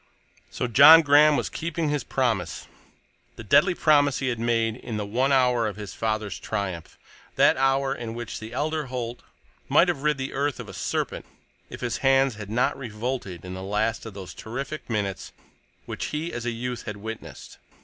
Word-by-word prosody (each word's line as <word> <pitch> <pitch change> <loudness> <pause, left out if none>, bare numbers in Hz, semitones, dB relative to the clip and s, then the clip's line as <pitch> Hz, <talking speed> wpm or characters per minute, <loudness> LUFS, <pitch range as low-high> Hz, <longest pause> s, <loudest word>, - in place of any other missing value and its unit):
So - - -3
John 145 +7 +9
Graham 145 0 +6
was - - -1
keeping 165 -1 -3
his 145 -1 -1
promise, 110 -11 -1 0.7
the - - -9
deadly 175 - +4
promise 145 -4 +3
he 130 - -1
had 120 -2 -3
made 115 -1 +1
in 115 -4 -6
the 105 - -3
one 125 +7 0
hour 125 -4 +3
of 105 - -5
his 105 -3 -8
father's 110 -3 -2
triumph—that 95 -4 -2
hour 135 0 +1
in 115 -1 -6
which 120 -2 -6
the 110 +1 -9
elder 150 +3 -2
Holt 125 -1 -5 0.5
might - - +5
have 135 - -2
rid 150 -1 +1
the 135 0 -4
earth 140 -1 -1
of - - -7
a - - -10
serpent - - -3 0.4
if - - -9
his 120 -1 -2
hands 135 -1 +3
had 105 -2 -9
not 115 +4 +1
revolted 115 -7 -5
in 90 - -6
the 95 - -6
last 105 +3 -1
of 105 - -10
those 95 -2 -8
terrific 135 +7 -6
minutes 100 -4 -3 0.5
which - - -5
he 155 +3 -4
as 120 0 -4
a - - +2
youth 120 +1 -5
had 105 -1 -5
witnessed. 110 +2 -9
120 Hz, 185 wpm, -25 LUFS, 110-135 Hz, 0.7 s, John